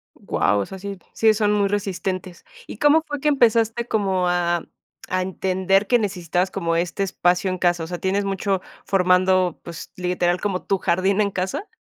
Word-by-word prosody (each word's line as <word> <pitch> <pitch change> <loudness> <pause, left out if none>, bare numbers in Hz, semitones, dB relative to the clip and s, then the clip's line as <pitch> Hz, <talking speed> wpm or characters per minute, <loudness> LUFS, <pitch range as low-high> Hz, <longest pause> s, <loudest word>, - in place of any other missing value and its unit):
Guau. 105 - 0
O - - -2
sea, 190 - -9
sí 200 0 -6 0.2
sí 220 -1 +4
son 210 -1 +1
muy 200 -1 +2
resistentes. 190 -2 -3 0.2
¿Y - - -8
cómo 295 +4 +4
fue 290 -1 -4
que 300 - -1
empezaste 235 -3 +2
como 190 -4 0
a 175 -1 +1 0.4
a 185 0 0
entender, 190 +1 +1
que 245 +2 +3
necesitabas 180 -2 -1
como 170 -4 -2
este 175 +3 -1
espacio 180 0 +1
en 185 - -3
casa? 175 -2 +1
O - - -5
sea, 175 0 -5
¿tienes 195 +1 0
mucho 195 -1 -1 0.2
formando, 185 -1 +2
pues, 170 -1 -9
literal, 180 -1 0
como 195 -3 -2
tu 195 -2 0
jardín 190 +4 +1
en 200 - +1
casa? 190 - -3
190 Hz, 185 wpm, -22 LUFS, 180-205 Hz, 0.4 s, sí